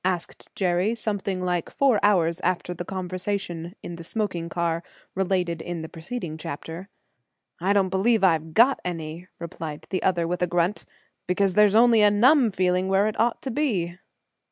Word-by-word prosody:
asked 180 -2 -3
Jerry, 185 +4 +1
something 200 -4 -2
like 175 -2 -1
four 270 -6 +2
hours 175 -4 +3
after 180 0 -1
the 175 - -6
conversation 185 -1 -4
in 170 - -7
the 170 - -9
smoking 175 -3 -3
car 170 0 -1 0.3
related 180 -3 -1
in 170 -2 -5
the 160 - -7
preceding 165 -1 -6
chapter. 165 +5 -7 0.7
"Don't 195 +1 +2
believe 205 +4 +2
I've 160 -3 +2
got 255 +4 +5
any," 165 0 -5
replied 160 -2 -7
the 185 - -1
other, 175 -3 +1
with 180 +1 -3
a 180 - +2
grunt, 175 +3 0 0.4
"because 190 +1 +1
there's 210 +1 +5
only 230 -1 +6
a 210 - +7
numb 245 +5 +5
feeling 185 -1 +1
where 195 +1 +3
it 215 - -4
ought 235 +1 +1
to 265 - -3
be." 195 - -1
185 Hz, 165 wpm, -25 LUFS, 170-205 Hz, 0.7 s, a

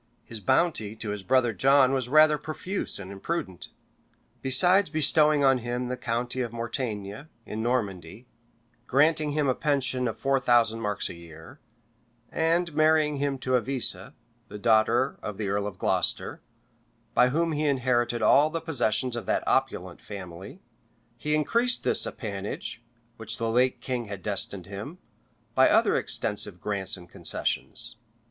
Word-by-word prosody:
His 115 - -8
bounty 110 - +1
to 110 -1 -5
his 105 -1 -4
brother 125 +2 +2
John 135 +5 +4
was 130 -2 -1
rather 155 +1 +5
profuse 180 +6 -3
and 95 -1 -8
imprudent. 100 - -4 0.7
Besides 180 +8 +4
bestowing 150 -1 +4
on 135 -1 +4
him 120 +1 -3
the 125 - -2
county 120 +1 -2
of 120 -2 -3
Mortaigne, 115 0 -4 0.2
in 110 - -5
Normandy, 105 -4 -2 0.6
granting 150 +2 +2
him 150 -1 +1
a 130 - +3
pension 130 -4 0
of 115 - -4
four 135 0 +1
thousand 120 -3 +3
marks 105 -3 -2
a - - -7
year, 80 -1 -13 0.7
and 170 +1 +1
marrying 155 -1 +3
him 140 0 -1
to 130 0 -4
Avisa, 125 +1 -1 0.3
the - - -8
daughter 115 +4 +2
of 105 -2 -6
the 105 -2 -3
earl 100 +1 -1
of 100 -3 -7
Glocester, - - -1 0.7
by 125 +1 +5
whom 165 +5 0
he 155 0 -1
inherited 120 -4 +1
all 145 +7 +5
the 165 +1 -3
possessions 125 -6 0
of 120 - -6
that - - 0
opulent - - -1
family, 95 - -9 0.5
he 150 +5 -1
increased 235 +11 +1
this - - +2
appanage, 100 +1 -5 0.4
which 115 - -3
the 115 0 -1
late 125 +1 +2
king 125 -1 -3
had 100 -3 -8
destined 100 -2 -2
him, 100 - -8 0.6
by - - +5
other - - +4
extensive 105 -3 -1
grants 100 -1 -3
and 90 -1 -13
concessions. - - -3
125 Hz, 150 wpm, -27 LUFS, 105-145 Hz, 0.7 s, rather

